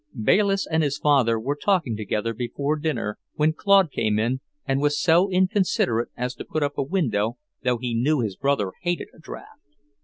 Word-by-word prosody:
Bayliss 195 Hz, -, +2 dB
and 160 Hz, 0 st, 0 dB
his 140 Hz, -2 st, 0 dB
father 130 Hz, -6 st, +3 dB
were 135 Hz, +6 st, -2 dB
talking 160 Hz, -, 0 dB
together 105 Hz, +2 st, -2 dB
before 125 Hz, +6 st, -2 dB
dinner 150 Hz, -9 st, -3 dB, 0.2 s
when 155 Hz, +1 st, +2 dB
Claude 195 Hz, -2 st, +4 dB
came 105 Hz, -4 st, 0 dB
in 120 Hz, +4 st, 0 dB, 0.2 s
and 135 Hz, +1 st, 0 dB
was 145 Hz, 0 st, +1 dB
so 175 Hz, +4 st, +4 dB
inconsiderate 185 Hz, -, +1 dB
as 125 Hz, +1 st, -2 dB
to -, -, -8 dB
put 155 Hz, -, -2 dB
up 145 Hz, 0 st, -2 dB
a -, -, +3 dB
window, 125 Hz, -, 0 dB, 0.3 s
though 125 Hz, -1 st, +1 dB
he 120 Hz, 0 st, -3 dB
knew 135 Hz, +6 st, +2 dB
his 105 Hz, -4 st, -2 dB
brother 135 Hz, -8 st, 0 dB
hated 175 Hz, 0 st, -2 dB
a -, -, -19 dB
draft. 160 Hz, -, -11 dB
140 Hz, 185 wpm, -24 LUFS, 115-160 Hz, 0.3 s, Claude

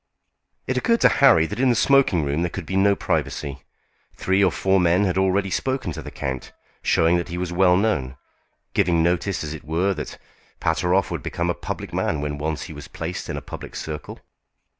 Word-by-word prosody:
It -, -, -1 dB
occurred 230 Hz, -1 st, +2 dB
to -, -, +7 dB
Harry 85 Hz, -13 st, +7 dB
that 105 Hz, +7 st, -5 dB
in 130 Hz, 0 st, +4 dB
the 120 Hz, -, +3 dB
smoking 115 Hz, -, +3 dB
room 70 Hz, +3 st, -1 dB
there 85 Hz, -, 0 dB
could 95 Hz, 0 st, -6 dB
be 95 Hz, -, -4 dB
no 100 Hz, +1 st, +4 dB
privacy. 70 Hz, -7 st, -2 dB, 0.5 s
Three 95 Hz, +1 st, +2 dB
or 95 Hz, -, +4 dB
four 95 Hz, 0 st, +2 dB
men 90 Hz, +2 st, +3 dB
had 90 Hz, -, 0 dB
already 95 Hz, +1 st, +1 dB
spoken 130 Hz, -3 st, -1 dB
to -, -, -6 dB
the -, -, -8 dB
count, 65 Hz, -1 st, -5 dB, 0.3 s
showing 80 Hz, +2 st, +3 dB
that 85 Hz, -, -3 dB
he 85 Hz, -, -5 dB
was 90 Hz, -1 st, -3 dB
well 90 Hz, 0 st, +4 dB
known, 75 Hz, -12 st, 0 dB, 0.6 s
giving 85 Hz, -2 st, +2 dB
notice, 90 Hz, +2 st, 0 dB
as 75 Hz, 0 st, -4 dB
it 80 Hz, -, -9 dB
were, 85 Hz, +6 st, 0 dB
that 75 Hz, -5 st, -6 dB, 0.4 s
Pateroff 90 Hz, +4 st, +1 dB
would -, -, -3 dB
become 85 Hz, 0 st, -1 dB
a -, -, -1 dB
public -, -, -6 dB
man 80 Hz, -, 0 dB
when 75 Hz, 0 st, -3 dB
once 75 Hz, 0 st, -2 dB
he -, -, -8 dB
was -, -, -9 dB
placed 85 Hz, +2 st, -5 dB
in -, -, -3 dB
a -, -, -6 dB
public -, -, -9 dB
circle. 75 Hz, -1 st, -6 dB
90 Hz, 205 wpm, -23 LUFS, 80-95 Hz, 0.6 s, to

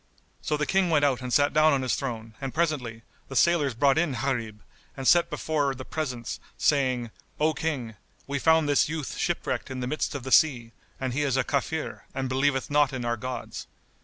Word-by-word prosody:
So 150 Hz, -, -1 dB
the 150 Hz, -, 0 dB
King 190 Hz, +2 st, +2 dB
went 150 Hz, -3 st, +3 dB
out 130 Hz, -3 st, +1 dB
and 125 Hz, -1 st, -5 dB
sat 145 Hz, +3 st, +3 dB
down 155 Hz, 0 st, +5 dB
on 135 Hz, -1 st, +1 dB
his 130 Hz, -, 0 dB
throne; 115 Hz, -5 st, -4 dB
and 135 Hz, 0 st, -4 dB
presently, 135 Hz, -9 st, -1 dB, 0.2 s
the 135 Hz, -, -8 dB
sailors 150 Hz, -5 st, +3 dB
brought 140 Hz, +5 st, +3 dB
in 160 Hz, -4 st, +1 dB
Gharib 115 Hz, -4 st, -3 dB, 0.3 s
and 135 Hz, -1 st, -3 dB
set 175 Hz, -1 st, +6 dB
him -, -, -32 dB
before 150 Hz, -2 st, -1 dB
the 130 Hz, 0 st, -8 dB
presence, 130 Hz, -7 st, -4 dB, 0.2 s
saying, 130 Hz, -5 st, +1 dB, 0.3 s
"O 155 Hz, +1 st, +3 dB
King, 140 Hz, -7 st, -3 dB, 0.3 s
we 140 Hz, 0 st, -2 dB
found 160 Hz, +1 st, +4 dB
this 145 Hz, 0 st, +3 dB
youth 155 Hz, -3 st, -4 dB
shipwrecked -, -, -2 dB
in 130 Hz, -1 st, -5 dB
the 125 Hz, -, -2 dB
midst 145 Hz, +2 st, -2 dB
of 135 Hz, -, -5 dB
the 130 Hz, -, -6 dB
sea, 125 Hz, -8 st, +4 dB, 0.3 s
and 130 Hz, -2 st, -2 dB
he 145 Hz, -, 0 dB
is 135 Hz, -3 st, +1 dB
a 135 Hz, -, +2 dB
Kafir 145 Hz, +3 st, -3 dB
and 135 Hz, -1 st, -1 dB
believeth 135 Hz, +1 st, 0 dB
not 145 Hz, -2 st, +3 dB
in 125 Hz, -2 st, -3 dB
our 120 Hz, 0 st, 0 dB
gods." 125 Hz, +2 st, -6 dB
135 Hz, 210 wpm, -27 LUFS, 125-150 Hz, 0.3 s, set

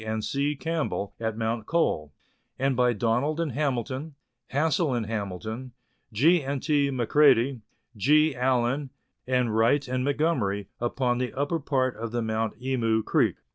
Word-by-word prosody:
and 110 Hz, 0 st, -3 dB
C. 140 Hz, +2 st, 0 dB
Campbell 155 Hz, -9 st, -2 dB
at 110 Hz, -1 st, -2 dB
Mount 115 Hz, -1 st, -2 dB
Cole; 80 Hz, -, 0 dB, 0.5 s
and 135 Hz, 0 st, +1 dB
by 125 Hz, 0 st, +3 dB
Donald 120 Hz, +8 st, 0 dB
and 165 Hz, -4 st, -1 dB
Hamilton, 135 Hz, +2 st, -2 dB, 0.3 s
Hassell 155 Hz, 0 st, +1 dB
and 115 Hz, -, -2 dB
Hamilton, 110 Hz, +4 st, -5 dB, 0.4 s
G. 155 Hz, +11 st, +4 dB
and 140 Hz, -1 st, -3 dB
T. 145 Hz, -3 st, +2 dB
Macredie, 130 Hz, -1 st, +3 dB, 0.3 s
G. 150 Hz, +7 st, +3 dB
Allan, 130 Hz, +2 st, +1 dB, 0.4 s
and 125 Hz, -4 st, +1 dB
Wright 120 Hz, +5 st, +3 dB
and 125 Hz, 0 st, -1 dB
Montgomerie, 130 Hz, -, 0 dB
upon 120 Hz, 0 st, 0 dB
the 125 Hz, -1 st, -2 dB
upper 145 Hz, +4 st, -1 dB
part 130 Hz, -3 st, 0 dB
of 115 Hz, 0 st, -5 dB
the 120 Hz, 0 st, -1 dB
Mount 110 Hz, 0 st, -2 dB
Emu 115 Hz, -4 st, 0 dB
Creek. -, -, +2 dB
125 Hz, 145 wpm, -26 LUFS, 115-145 Hz, 0.5 s, G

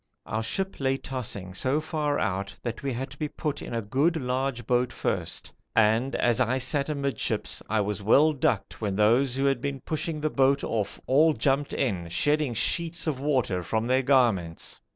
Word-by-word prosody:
Our 110 Hz, -, -2 dB
ship 190 Hz, -, -2 dB
lay 135 Hz, -1 st, +1 dB
tossing 105 Hz, -9 st, -5 dB
so 130 Hz, +9 st, +1 dB
far 155 Hz, -2 st, -1 dB
out 100 Hz, -1 st, -2 dB
that 120 Hz, -1 st, -4 dB
we 140 Hz, -, -2 dB
had 130 Hz, +2 st, -4 dB
to 145 Hz, -, -13 dB
be 150 Hz, -, -1 dB
put 150 Hz, 0 st, -4 dB
in -, -, -7 dB
a 115 Hz, -1 st, -2 dB
good 140 Hz, +11 st, +1 dB
large 130 Hz, -2 st, -2 dB
boat 125 Hz, +1 st, +1 dB
first -, -, -3 dB, 0.2 s
and 115 Hz, +4 st, +3 dB
as 120 Hz, 0 st, +2 dB
I 130 Hz, +1 st, +2 dB
sat 140 Hz, +3 st, +1 dB
amidships 140 Hz, -2 st, -1 dB
I 110 Hz, 0 st, +2 dB
was 105 Hz, 0 st, -2 dB
well 145 Hz, +9 st, +5 dB
ducked 115 Hz, -8 st, -1 dB
when 100 Hz, -3 st, -1 dB
those 120 Hz, +5 st, +3 dB
who 135 Hz, +1 st, 0 dB
had 135 Hz, -1 st, +1 dB
been 140 Hz, -1 st, -3 dB
pushing 155 Hz, +2 st, -3 dB
the 155 Hz, 0 st, -1 dB
boat 135 Hz, +1 st, +3 dB
off 110 Hz, -3 st, -2 dB
all 155 Hz, +4 st, +4 dB
jumped 140 Hz, 0 st, 0 dB
in, 95 Hz, -10 st, -1 dB
shedding 145 Hz, -, +1 dB
sheets 170 Hz, -, 0 dB
of 150 Hz, -5 st, -1 dB
water 130 Hz, -10 st, 0 dB
from 110 Hz, +6 st, -1 dB
their 130 Hz, +2 st, +2 dB
garments. 120 Hz, -11 st, +1 dB
130 Hz, 190 wpm, -27 LUFS, 110-145 Hz, 0.2 s, well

